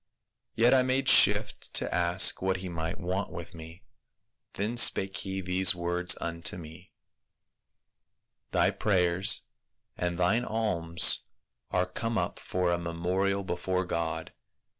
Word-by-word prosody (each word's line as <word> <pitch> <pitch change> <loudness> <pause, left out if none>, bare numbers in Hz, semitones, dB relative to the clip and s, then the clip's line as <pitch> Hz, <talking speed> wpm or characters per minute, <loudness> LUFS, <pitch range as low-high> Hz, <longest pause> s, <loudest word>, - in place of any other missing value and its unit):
Yet 120 +3 +4
I 130 - +5
made 130 +1 -1
shift 105 0 +4
to - - 0
ask 90 +2 +2
what 95 0 0
he 95 0 -7
might 80 +1 -5
want 95 +2 -3
with 85 -2 -9
me. 80 +2 -12 0.7
Then 105 +4 -3
spake 95 -4 +4
he 95 -1 -4
these 90 0 +3
words 90 +1 +1
unto 85 +2 -2
me, 85 +2 -12 0.7
' - - -55
Thy - - +2
prayers 95 0 +1 0.5
and 85 -1 -3
thine 95 +7 +1
alms 95 -8 +2 0.5
are 90 0 0
come 115 +5 -4
up - - -3
for 90 -1 -2
a 85 - -1
memorial 90 +4 -2
before 95 +1 -2
God. 85 -2 -4
90 Hz, 135 wpm, -28 LUFS, 85-100 Hz, 0.7 s, I